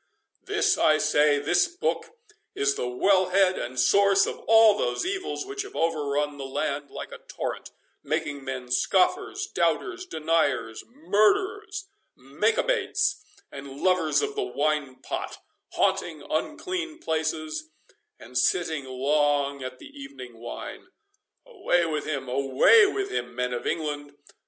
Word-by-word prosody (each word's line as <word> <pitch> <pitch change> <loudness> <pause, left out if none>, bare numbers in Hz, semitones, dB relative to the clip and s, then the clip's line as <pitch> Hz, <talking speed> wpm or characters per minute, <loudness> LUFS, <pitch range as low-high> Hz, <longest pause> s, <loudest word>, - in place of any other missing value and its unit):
This, 420 -1 +1
I 155 0 +5
say, 150 -1 +3
this 145 - +2
book 355 +7 -2 0.5
is 140 0 +2
the 125 - -3
well 185 +9 +2
head 190 0 +3
and 130 +2 -5
source 195 +9 +4
of - - -5
all 225 -1 +7
those 120 - -1
evils 385 0 -3
which 405 +1 -4
have 405 +1 -9
overrun 150 -3 -1
the - - -4
land 140 +1 -3
like - - -8
a - - -9
torrent, - - -6 0.3
making 145 -2 -2
men 130 -2 -6
scoffers, 375 - +1
doubters, 370 -2 0
deniers, 155 - 0
murderers, 390 - +1 0.3
makebates, - - 0 0.3
and 140 0 -9
lovers 180 - +2
of 425 0 -2
the 420 - -2
wine 150 - -1
pot, - - -4 0.4
haunting 155 -4 0
unclean 335 - -3
places, 155 - -3 0.5
and 125 +2 -3
sitting 160 -1 +1
long 140 +1 +1
at 130 0 -6
the - - -13
evening 130 -4 -10
wine. 120 - -8 0.6
Away 175 -1 +1
with 155 -2 -2
him, 135 -4 -3
away 135 - +5
with 395 0 -3
him, 125 0 -3
men 125 0 -1
of 120 - -4
England! 145 -2 -3
155 Hz, 135 wpm, -26 LUFS, -, 0.6 s, all